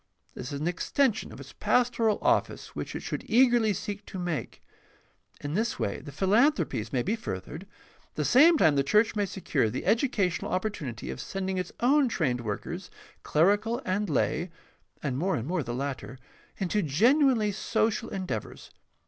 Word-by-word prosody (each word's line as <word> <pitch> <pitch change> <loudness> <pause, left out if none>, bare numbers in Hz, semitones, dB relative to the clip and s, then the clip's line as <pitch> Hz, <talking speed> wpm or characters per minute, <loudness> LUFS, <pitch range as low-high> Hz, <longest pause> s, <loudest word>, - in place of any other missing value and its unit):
This 125 - -7
is 140 - -4
an 155 - -2
extension 225 - 0
of - - -11
its - - -11
pastoral 235 -3 +2
office - - 0
which - - -5
it - - -4
should - - -4
eagerly 240 -2 +4
seek 205 +2 -4
to - - -7
make. 175 -4 -4 0.8
In 145 +1 -4
this 225 +5 0
way - - -2
the 145 - -10
philanthropies 190 - +2
may 125 -2 0
be 210 +5 0
furthered, 150 - -6
and - - -10 0.4
at - - -38
the - - -1
same 315 +6 +6
time 160 - +4
the 140 - +3
church 210 +10 +3
may 205 -1 0
secure 150 - 0
the 125 +4 -4
educational 215 -3 +1
opportunity 165 - -3
of - - -6
sending 190 0 -3
its 180 - -4
own 270 +2 +4
trained 130 - 0
workers, 160 - -5 0.3
clerical 205 +9 +2
and 195 +1 -1
lay 165 +5 0 0.5
(and 135 -3 -1
more 185 +3 +1
and 120 -2 -4
more 180 0 0
the 120 -3 -5
latter), 135 -1 -4 0.4
into 195 +2 0
genuinely 225 - +3
social 220 +2 -1
en 190 -1 -3
deavors. - - -6
190 Hz, 175 wpm, -28 LUFS, 150-225 Hz, 0.8 s, same